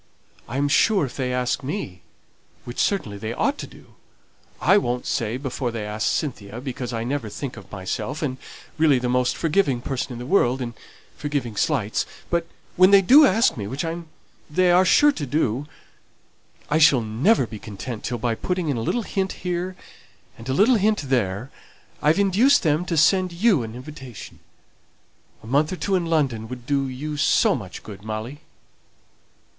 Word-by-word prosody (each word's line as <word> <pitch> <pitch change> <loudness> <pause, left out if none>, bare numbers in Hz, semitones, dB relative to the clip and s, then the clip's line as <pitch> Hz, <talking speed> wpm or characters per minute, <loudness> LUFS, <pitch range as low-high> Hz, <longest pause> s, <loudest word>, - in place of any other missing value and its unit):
I 125 - -3
am 145 +1 +2
sure 190 +4 +3
if 130 - -8
they 130 -2 -2
ask 125 +1 -1
me 130 - -5 0.6
which 120 - -7
certainly 110 - 0
they 110 +2 -4
ought 285 - 0
to - - -5
do - - -17 0.7
I 195 - +4
won't 125 -8 -2
say 115 +1 -1
before 130 -1 -3
they 115 -2 -4
asked 105 +1 -2
Cynthia, 115 -6 -3
because 125 -1 -5
I 115 -1 -3
never 125 -2 -3
think 130 +5 -6
of 100 -4 -13
myself, 105 - -4
and 130 -3 -2
am - - -22 0.4
really 155 -4 +5
the 125 0 -2
most 125 0 +1
forgiving 160 -6 +1
person 130 +1 -3
in 120 - -6
the 120 - -7
world, 130 -5 +2
in 120 -2 -4 0.4
forgiving 140 -7 -3
slights; 110 -3 0 0.2
but 170 -1 0 0.3
when 185 +1 +7
they 200 -1 +7
do 280 +9 +8
ask 225 +5 +3
me, 100 -4 -5
which 135 +8 -3 0.6
they 180 +4 +3
are 180 +2 +5
sure 295 +9 +5
to 150 - -5
do, 135 -1 0 1.0
I 155 - +1
shall 150 -5 +6
never 125 - +2
be 110 -2 -9
content 110 +3 -7
till, 120 - -2
by 115 0 -1
putting 180 +6 -2
in 135 - 0
a - - -2
little 235 - -1
hint 190 -2 -2
here 180 +1 -2 0.6
and 115 +3 -10
a - - +1
little 230 - +5
hint 210 -2 +1
there, 115 0 -1 0.5
I've 155 +4 +3
induced 205 +8 +4
them 155 +1 +1
to 170 - -2
send 185 +4 +4
you 185 - +3
an 110 0 -6
invitation. 130 -3 -10 1.0
A - - -12
month 140 +6 +1
or - - -2
two 195 +2 -2
in 180 -3 +1
London 135 -9 0
would 120 0 -8
do 140 0 0
you 145 +4 -5
so 145 - +3
much 100 -8 -7
good, 100 -2 -10
Molly." 110 +7 -6
135 Hz, 185 wpm, -23 LUFS, 120-175 Hz, 1.0 s, do